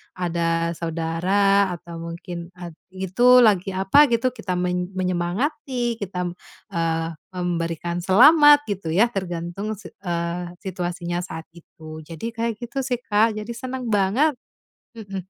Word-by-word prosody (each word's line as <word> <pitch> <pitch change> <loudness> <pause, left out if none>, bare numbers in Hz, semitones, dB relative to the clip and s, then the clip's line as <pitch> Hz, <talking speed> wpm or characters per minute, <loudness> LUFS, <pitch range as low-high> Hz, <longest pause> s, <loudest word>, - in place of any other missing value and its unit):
ada 170 -1 0
saudara, 180 +4 +1
atau 170 0 -9
mungkin 170 +1 -7
at 175 -1 -9 0.2
itu 240 +7 +5
lagi 195 -4 +3
apa 195 +11 +5
gitu, 235 0 +1
kita 205 -7 -5
men 180 0 -1
menyemangati, 230 - -1
kita, 180 -3 -3 0.4
eee, 165 -1 -1 0.3
memberikan 170 -1 -2
selamat 290 - +7
gitu 180 -5 -3
ya 225 +6 +4
tergantung 185 +2 -4
sit 195 -3 -12
eee, 175 +1 -3
situasinya 175 -1 -3
saat 160 -3 -8
itu. 160 -2 -12
Jadi 170 +8 -6
kayak 230 -1 -2
gitu 255 +3 -4
sih, 245 -2 -2
Kak. 215 +1 +2
Jadi 215 +2 -5
seneng 255 0 -5
banget! 230 +9 +2 0.6
Mhm. 195 -3 -6
185 Hz, 130 wpm, -23 LUFS, 170-225 Hz, 0.6 s, selamat